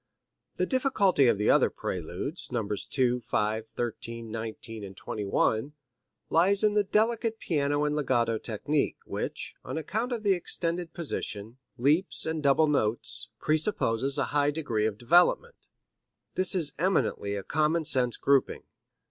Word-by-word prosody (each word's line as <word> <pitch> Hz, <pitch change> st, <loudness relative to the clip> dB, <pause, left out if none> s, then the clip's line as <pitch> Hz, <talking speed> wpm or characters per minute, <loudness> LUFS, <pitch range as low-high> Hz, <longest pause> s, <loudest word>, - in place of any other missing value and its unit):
The -, -, 0 dB
difficulty 215 Hz, -, +2 dB
of 110 Hz, -, +3 dB
the 105 Hz, -, +3 dB
other -, -, +4 dB
Preludes, 90 Hz, -, -5 dB
Nos. 105 Hz, -4 st, -2 dB
2, 125 Hz, +1 st, +1 dB
5, 110 Hz, -1 st, -1 dB
13, 115 Hz, -1 st, -4 dB
19 110 Hz, 0 st, -6 dB
and 95 Hz, -1 st, -9 dB
21, 110 Hz, +5 st, -1 dB, 0.6 s
lies 195 Hz, +5 st, +4 dB
in 210 Hz, -1 st, +4 dB
the 210 Hz, 0 st, +3 dB
delicate 225 Hz, +2 st, +1 dB
piano 145 Hz, -6 st, 0 dB
and 150 Hz, 0 st, 0 dB
legato 120 Hz, -6 st, +1 dB
technique, 140 Hz, +6 st, -1 dB
which, -, -, -4 dB
on -, -, -5 dB
account 220 Hz, +10 st, -2 dB
of 235 Hz, -3 st, -3 dB
the 200 Hz, -2 st, +4 dB
extended 170 Hz, -1 st, -2 dB
positions, 115 Hz, -8 st, -4 dB, 0.2 s
leaps 150 Hz, +9 st, +2 dB
and 160 Hz, -1 st, -2 dB
double 145 Hz, +2 st, +4 dB
notes, 120 Hz, -3 st, -1 dB
presupposes 140 Hz, -, +1 dB
a -, -, +2 dB
high 145 Hz, 0 st, +3 dB
degree 120 Hz, -8 st, -1 dB
of 105 Hz, -2 st, -4 dB
development. 175 Hz, -, +2 dB, 0.7 s
This 185 Hz, +1 st, +1 dB
is 155 Hz, -6 st, +4 dB
eminently 165 Hz, -, 0 dB
a 100 Hz, -, -4 dB
common 155 Hz, -, +1 dB
sense 125 Hz, -4 st, +2 dB
grouping. 140 Hz, -1 st, +1 dB
140 Hz, 140 wpm, -28 LUFS, 115-170 Hz, 0.7 s, other